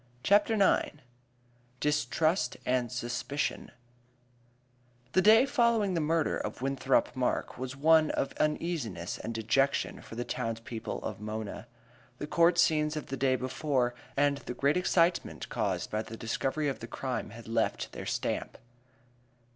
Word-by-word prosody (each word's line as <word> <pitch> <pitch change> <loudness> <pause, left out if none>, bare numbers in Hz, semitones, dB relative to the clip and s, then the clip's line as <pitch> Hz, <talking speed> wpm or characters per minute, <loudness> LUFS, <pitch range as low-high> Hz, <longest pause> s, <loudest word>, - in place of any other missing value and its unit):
CHAPTER 210 +2 +4
IX 195 -7 +2 0.8
Distrust 150 - +1
and 125 -2 0
Suspicion 125 +4 -3 1.4
The 185 - +4
day 220 +5 +7
following 235 -7 +2
the 170 - 0
murder 160 0 +1
of - - -5
Winthrop 135 0 +1
Mark 125 -1 -1
was 130 +1 -4
one 155 +2 +5
of - - -1
uneasiness 150 - -2
and 115 - -5
dejection 115 +5 0
for - - -11
the 120 +1 -3
towns 115 0 -3
people 115 -1 -5
of - - -5
Mona. 110 +1 -5 0.5
The 145 - -4
court 170 +3 +3
scenes 155 -2 +3
of 150 - -6
the 135 - -2
day 130 0 +2
before 130 -1 0 0.2
and 145 0 +3
the 125 - -7
great 140 +2 +2
excitement 175 -1 +1
caused - - -2
by 110 - 0
the 115 +1 -8
discovery 135 +6 -1
of 135 - -2
the 115 - -7
crime 130 +1 -4
had 115 +2 -11
left 115 - -1
their - - -7
stamp. - - -2
140 Hz, 145 wpm, -30 LUFS, 120-160 Hz, 1.4 s, day